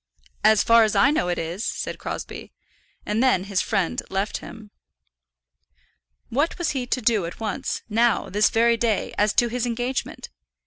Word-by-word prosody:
"As 215 -1 +5
far 230 0 +6
as 215 -1 0
I 200 +7 +5
know, 180 -12 0
it 175 - -1
is," 170 +6 -4
said - - -4
Crosbie. - - -6 0.5
And 210 +2 0
then 255 -8 +3
his 195 -1 -1
friend 195 -6 -1
left 195 +2 -2
him. 220 -3 -12 1.6
What 290 +7 0
was 345 - -1
he 255 -3 -3
to 255 - -1
do 215 -6 +2
at 170 - -9
once, 215 -4 -3
now, 230 +1 +2
this 210 +2 +2
very 235 +1 +3
day, 225 -3 -1
as 210 0 +3
to 240 - +3
his 245 +1 -2
engagement? 245 +2 -3
225 Hz, 170 wpm, -23 LUFS, 200-240 Hz, 1.6 s, far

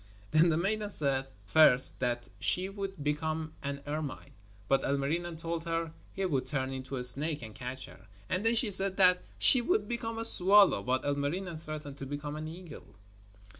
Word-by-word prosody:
Then 160 +2 +4
the 155 - 0
maiden 210 +4 -2
said, 135 -7 -1 0.2
first, 130 +4 +7
that 120 -1 -3
she 185 +1 -1
would 195 -5 -7
become 155 +1 -3
an 140 0 -6
ermine, 150 -1 -6 0.4
but 135 0 +1
Ilmarinen 160 +5 -3
told 165 0 -5
her 165 -1 -3 0.2
he 195 - -4
would 140 -8 -2
turn 135 -2 -3
into 130 0 -7
a 125 - -4
snake 145 +4 +2
and 110 -1 -10
catch 130 +1 -7
her; 95 - -17 0.2
and 185 - -3
then 225 +1 +1
she 225 -2 0
said 195 0 +3
that 180 -2 +5 0.2
she 255 - +4
would 365 - -1
become 230 -1 -5
a 225 - -3
swallow, 195 - +6
but 130 +5 -2
Ilmarinen 155 +5 -3
threatened 150 -3 -9
to 135 - -7
become 145 +1 -6
an 155 +1 -6
eagle. 170 -1 -12
155 Hz, 180 wpm, -29 LUFS, 140-185 Hz, 0.4 s, first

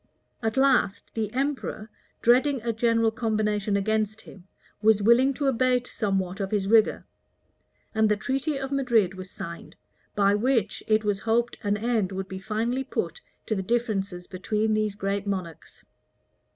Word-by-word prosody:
} - - -47
At 225 +3 -2
last, 265 -7 +2
the 215 -2 -2
emperor, 260 -4 -3 0.3
dreading 260 +3 +4
a 235 -1 -1
general 230 0 +2
combination 215 -3 0
against 215 +1 -1
him, 190 -1 -15 0.3
was 215 -1 +4
willing 240 +5 +5
to 285 - -2
abate 255 -1 +2
somewhat 195 -4 -1
of 195 -1 -2
his 200 -2 0
rigor: 220 +1 +3 0.9
and 220 0 +3
the 210 - +3
treaty 270 +6 -1
of 270 0 -4
Madrid 240 -9 +2
was 185 0 -8
signed, 170 -2 -8 0.4
by 200 -1 +4
which, 230 +1 +1
it 215 0 +3
was 205 -1 0
hoped 230 +2 0
an 205 -1 0
end 220 -3 0
would 190 0 -4
be 190 0 -6
finally 225 +6 -1
put 485 - -4 0.2
to - - -1
the 195 - -1
differences 195 -5 -1
between 210 +4 -1
these 215 -1 0
great 200 0 -2
monarchs. 175 -5 -5
215 Hz, 160 wpm, -26 LUFS, 200-240 Hz, 0.9 s, willing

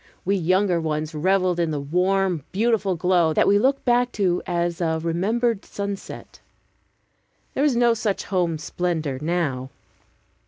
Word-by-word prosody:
We 195 +2 +2
younger 185 0 +1
ones 155 0 -2
reveled 180 +2 +1
in 170 -1 +1
the 150 -2 -2
warm, 180 +2 0
beautiful 210 -2 +1
glow, 175 -2 +2
that - - +3
we 205 +1 +5
look 270 +5 +1
back 245 0 +2
to 185 -4 +1
as 175 -1 -1
to 165 -2 0
a - - -2
remembered 200 +7 0
sunset. 200 -1 -7 1.1
There 275 - 0
is 290 -4 +3
no 240 0 +4
such 215 -3 -2
home 175 -4 -1
splendor 155 -4 -3
now. 150 -6 -1
180 Hz, 150 wpm, -23 LUFS, 165-200 Hz, 1.1 s, we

